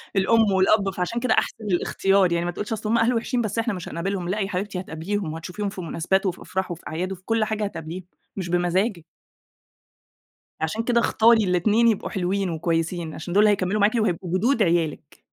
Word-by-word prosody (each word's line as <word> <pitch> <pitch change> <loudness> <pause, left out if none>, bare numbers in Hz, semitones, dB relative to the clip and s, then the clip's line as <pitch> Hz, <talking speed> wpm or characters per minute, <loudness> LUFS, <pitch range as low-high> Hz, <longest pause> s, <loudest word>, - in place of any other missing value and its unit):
الأم 210 +2 +3
والأب، 195 +1 +3
فعشان 185 +6 -2
كده 255 - +2
أحسِن 220 - -1
الاختيار، 195 +1 +2
يعني 170 0 0
ما 175 - -1
تقولش 210 +5 -4
أصل 215 0 -4
هم 235 - +3
أهلوا 230 +1 +2
وحشين، 240 +1 -1
بس 215 +1 -2
إحنا 230 -2 0
مش 180 - -6
هنقابلهم، 180 +1 -3
لأ 210 +3 -1
يا 195 - 0
حبيبتي 190 0 -3
هتقابليهم 180 0 -4
وهتشوفيهم 180 +5 -4
في 190 - -7
مناسبات 175 +4 0
وفي 185 -1 -2
أفراح 190 -1 -3
وفي 170 - -7
أعياد 180 +4 -3
وفي 185 -1 -7
كل 225 -1 +1
حاجة 215 -1 -2
هتقابليهم، 175 -2 -5 0.3
مش 180 -3 -4
بمزاجِك. 175 +1 0 1.6
عشان 215 +8 -1
كده 235 0 +2
اختاري 230 -1 +4
الاتنين 205 +6 +3
يبقوا 220 -4 +1
حلوين 190 0 -1
وكويسين 165 0 -2
عشان 175 +2 -6
دُول 205 +2 +5
اللي 210 - +6
هيكمِّلوا 200 +1 0
معاكِ 215 +3 +3
وهيبقوا 185 -4 0
جدود 235 +2 +2
عيالِك. 165 -3 -1
195 Hz, 190 wpm, -24 LUFS, 175-215 Hz, 1.6 s, اللي